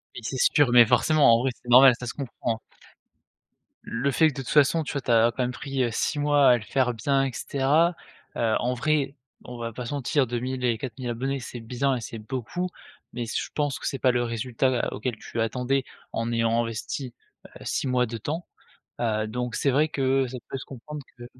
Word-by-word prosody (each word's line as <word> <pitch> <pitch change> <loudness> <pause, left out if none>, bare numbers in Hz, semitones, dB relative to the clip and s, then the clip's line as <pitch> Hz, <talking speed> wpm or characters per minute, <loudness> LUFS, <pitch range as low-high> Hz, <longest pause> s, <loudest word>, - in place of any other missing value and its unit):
Mais 120 - -7
c'est 130 +3 -3 0.2
sûr. 145 -5 +4
Mais 120 -1 +8
forcément, 125 +3 +4
en - - +2
vrai 130 0 0
c'est 120 - -14
normal, 125 +1 +9
ça 125 - -6
se 115 - -4
comprend 120 -4 -4 1.2
le 130 +4 -1
fait 160 +5 +4
que 155 - -1
de 135 - -5
toute - - -8
façon 150 +2 +4
tu 145 - -6
as - - -2
tu - - -8
as 115 0 +5
quand 130 - -2
même 125 - -1
pris, 135 +1 -2
heu, 120 - +1
6 145 +6 -1
mois 145 -2 +4
à 125 - +6
le 110 - -8
faire 125 +2 +1
bien 135 +5 +1
et 130 - -3
cetera, 150 +8 +2 0.4
heu, 115 -2 +2
en 125 +1 0
vrai 140 +1 0 0.3
on 125 -1 -9
va 115 -1 -5
pas 125 0 -6
se - - -4
mentir 140 0 +1
2000 125 +2 -3
et 120 -2 +2
4000 125 0 -5
abonnés 135 +4 -2
c'est 120 -1 -7
bien, 130 +4 0
et 120 - -4
c'est 115 0 -7
beaucoup. 130 +10 -4 0.5
Mais 120 -1 -3
je - - -3
pense 145 -3 -1
que - - -4
c'est 135 - -2
pas 125 - +4
le 120 0 +1
résultat 120 +2 0
à - - -3
auquel 125 -3 -3
tu 115 - -5
attendais 125 +4 0 0.3
en 115 +1 -2
ayant 115 0 +2
investi, 115 +3 -5 0.3
heu, - - -25 0.2
6 - - -1
mois 125 -1 +2
de 115 0 -5
temps. 155 +10 -4 0.5
Heu, 110 -2 0
donc 125 +2 -3
c'est 140 - +1
vrai 145 +4 +3
que 135 -2 +1
ça 125 +1 -6
peut 135 - -3
se - - -8
comprendre 145 +3 -8 0.2
que 120 - -9
125 Hz, 225 wpm, -26 LUFS, 120-135 Hz, 1.2 s, normal